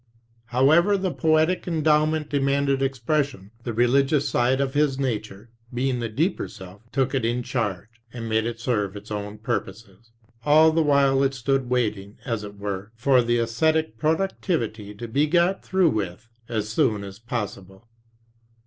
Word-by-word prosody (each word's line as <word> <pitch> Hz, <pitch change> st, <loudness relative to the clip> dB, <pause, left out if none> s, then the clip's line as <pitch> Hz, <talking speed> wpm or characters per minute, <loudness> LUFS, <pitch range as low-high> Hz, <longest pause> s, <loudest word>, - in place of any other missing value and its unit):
However, 155 Hz, -, +4 dB
the 190 Hz, -1 st, -1 dB
poetic 160 Hz, +3 st, +2 dB
endowment 155 Hz, -1 st, +2 dB
demanded 140 Hz, -1 st, +1 dB
expression. 135 Hz, -5 st, -1 dB
The 120 Hz, -, -2 dB
religious 135 Hz, +5 st, +2 dB
side 125 Hz, +2 st, +1 dB
of 135 Hz, -1 st, -1 dB
his 145 Hz, -2 st, +2 dB
nature, 110 Hz, -4 st, -4 dB, 0.2 s
being 125 Hz, 0 st, -1 dB
the 115 Hz, -1 st, -3 dB
deeper 155 Hz, -, -1 dB
self, 95 Hz, +2 st, -12 dB
took 135 Hz, 0 st, 0 dB
it 135 Hz, -3 st, 0 dB
in 120 Hz, +2 st, 0 dB
charge, 115 Hz, -3 st, -4 dB
and 115 Hz, -1 st, -6 dB
made 110 Hz, 0 st, +1 dB
it 115 Hz, -1 st, -5 dB
serve 105 Hz, -5 st, -1 dB
its 105 Hz, +1 st, -10 dB
own 105 Hz, 0 st, -4 dB
purposes. 110 Hz, 0 st, -5 dB, 0.3 s
All 155 Hz, +3 st, +6 dB
the 165 Hz, +1 st, +2 dB
while 140 Hz, -2 st, +3 dB
it 135 Hz, 0 st, +1 dB
stood 130 Hz, 0 st, 0 dB
waiting, 105 Hz, -5 st, -1 dB
as 115 Hz, -4 st, -2 dB
it 100 Hz, 0 st, -9 dB
were, 100 Hz, 0 st, -5 dB
for 125 Hz, +2 st, +3 dB
the 120 Hz, 0 st, +1 dB
esthetic 120 Hz, +2 st, 0 dB
productivity 150 Hz, -, -1 dB
to 120 Hz, +3 st, -7 dB
be 140 Hz, +7 st, +1 dB
got 175 Hz, +4 st, +2 dB
through 185 Hz, -4 st, +2 dB
with 95 Hz, 0 st, -4 dB, 0.2 s
as 110 Hz, -3 st, -2 dB
soon 110 Hz, -4 st, +1 dB
as 100 Hz, 0 st, -9 dB
possible. 105 Hz, -4 st, -6 dB
125 Hz, 160 wpm, -24 LUFS, 110-145 Hz, 0.3 s, All